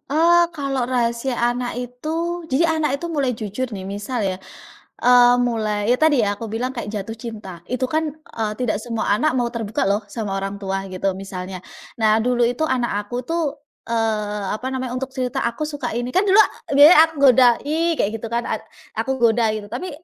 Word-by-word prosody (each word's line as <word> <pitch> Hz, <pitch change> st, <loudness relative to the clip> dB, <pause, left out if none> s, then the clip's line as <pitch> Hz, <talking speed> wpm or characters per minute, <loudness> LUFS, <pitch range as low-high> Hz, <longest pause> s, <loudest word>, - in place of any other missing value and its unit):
.Eee, 340 Hz, +3 st, +5 dB
kalau 275 Hz, -4 st, -1 dB
rahasia 245 Hz, 0 st, 0 dB
anak 240 Hz, +1 st, 0 dB
itu, 320 Hz, +8 st, -4 dB
jadi 270 Hz, +6 st, +3 dB
anak 280 Hz, -3 st, 0 dB
itu 345 Hz, -, -4 dB
mulai 280 Hz, -5 st, 0 dB
jujur 215 Hz, +4 st, -4 dB
nih, 190 Hz, -2 st, -6 dB
misal 205 Hz, +5 st, -4 dB
ya, 190 Hz, -2 st, -1 dB, 0.7 s
eee, 245 Hz, 0 st, +6 dB
mulai 215 Hz, -3 st, -1 dB
ya 250 Hz, -, +4 dB
tadi 310 Hz, -5 st, +4 dB
ya, 205 Hz, -1 st, 0 dB
aku 230 Hz, -, -7 dB
bilang 245 Hz, +4 st, -2 dB
kayak 235 Hz, -4 st, -4 dB
jatuh 215 Hz, +1 st, -5 dB
cinta, 210 Hz, -7 st, -8 dB
itu 255 Hz, +4 st, -1 dB
kan, 315 Hz, -1 st, 0 dB
eee, 225 Hz, -8 st, -5 dB
tidak 235 Hz, -4 st, 0 dB
semua 230 Hz, -2 st, -3 dB
anak 305 Hz, +7 st, +1 dB
mau 240 Hz, -1 st, +1 dB
terbuka 220 Hz, -4 st, -2 dB
loh 205 Hz, +2 st, +1 dB
sama 205 Hz, -4 st, -3 dB
orang 195 Hz, +1 st, -3 dB
tua, 195 Hz, 0 st, -3 dB
gitu, 190 Hz, +1 st, -1 dB
misalnya. 185 Hz, -1 st, -7 dB, 0.4 s
Nah, 220 Hz, 0 st, +4 dB
dulu 245 Hz, +1 st, +1 dB
itu 245 Hz, +6 st, -1 dB
anak 240 Hz, -6 st, -1 dB
aku 245 Hz, +3 st, -4 dB
tuh, 335 Hz, +3 st, -1 dB, 0.4 s
eee, 215 Hz, -3 st, -1 dB
apa 250 Hz, +4 st, -5 dB
namanya, 260 Hz, -2 st, -3 dB
untuk 260 Hz, +1 st, -3 dB
cerita, 255 Hz, -2 st, -2 dB
"Aku 235 Hz, +6 st, -3 dB
suka 290 Hz, -5 st, -4 dB
ini", 245 Hz, +1 st, -3 dB
kan 370 Hz, -, +4 dB
dulu 390 Hz, +2 st, +5 dB
ak 435 Hz, -, +6 dB, 0.3 s
biasanya 300 Hz, +3 st, +9 dB
aku 320 Hz, -, -14 dB, 0.2 s
goda, 250 Hz, 0 st, +6 dB, 0.2 s
"I" 330 Hz, +3 st, +1 dB
kayak 205 Hz, -, +1 dB
gitu 230 Hz, -, -4 dB
kan, 235 Hz, +1 st, -1 dB
ad -, -, -2 dB, 0.3 s
aku 265 Hz, -1 st, -2 dB
goda 230 Hz, -2 st, +3 dB
gitu, 215 Hz, -1 st, -6 dB
tapi 265 Hz, +11 st, -4 dB
245 Hz, 200 wpm, -21 LUFS, 215-265 Hz, 0.7 s, biasanya